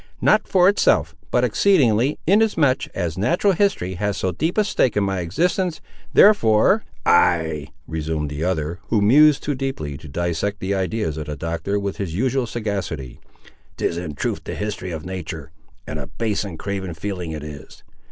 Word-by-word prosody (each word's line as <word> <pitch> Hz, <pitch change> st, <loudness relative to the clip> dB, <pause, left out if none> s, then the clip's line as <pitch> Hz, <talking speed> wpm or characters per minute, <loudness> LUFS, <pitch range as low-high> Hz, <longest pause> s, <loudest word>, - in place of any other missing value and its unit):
"Not -, -, +3 dB
for 180 Hz, -1 st, +4 dB
itself, 80 Hz, -, +3 dB, 0.2 s
but 125 Hz, -, +2 dB
exceedingly, 125 Hz, -, +3 dB
inasmuch 175 Hz, -9 st, +3 dB
as 85 Hz, -2 st, -2 dB
natural 175 Hz, -, +2 dB
history 180 Hz, -, 0 dB
has 105 Hz, -1 st, 0 dB
so 95 Hz, -, -1 dB
deep 160 Hz, -, -2 dB
a 215 Hz, -, +5 dB
stake 130 Hz, -, +1 dB
in 105 Hz, -, +3 dB
my 95 Hz, -1 st, -1 dB
existence. 170 Hz, -, 0 dB, 0.3 s
Therefore—" 200 Hz, -, +5 dB, 0.2 s
"Ay!" 80 Hz, -4 st, +3 dB, 0.2 s
resumed 80 Hz, -2 st, -3 dB
the 75 Hz, +2 st, -4 dB
other, 85 Hz, -1 st, -1 dB
who 110 Hz, -, +2 dB
mused 145 Hz, +8 st, +5 dB
too 145 Hz, -, -1 dB
deeply 125 Hz, -, -4 dB
to 75 Hz, +2 st, -12 dB
dissect 85 Hz, +7 st, -2 dB
the 95 Hz, +1 st, -2 dB
ideas 95 Hz, -4 st, -1 dB
of 75 Hz, -1 st, -5 dB
the 75 Hz, -, -4 dB
Doctor 85 Hz, +7 st, -2 dB
with 100 Hz, -1 st, -4 dB
his 90 Hz, -5 st, -4 dB
usual 130 Hz, +3 st, 0 dB
sagacity, 100 Hz, -, -4 dB, 0.6 s
"'tis -, -, -1 dB
in 85 Hz, -4 st, -5 dB
truth -, -, -3 dB
the -, -, -5 dB
history 105 Hz, -3 st, -4 dB
of 80 Hz, -2 st, -6 dB
natur', 85 Hz, -5 st, -6 dB, 0.3 s
and -, -, -5 dB
a -, -, -6 dB
base 105 Hz, +7 st, -2 dB
and 95 Hz, -6 st, -7 dB
craven 95 Hz, -3 st, -4 dB
feeling 90 Hz, 0 st, -4 dB
it 75 Hz, -2 st, -5 dB
is! 75 Hz, -2 st, -10 dB
95 Hz, 170 wpm, -22 LUFS, 80-130 Hz, 0.6 s, a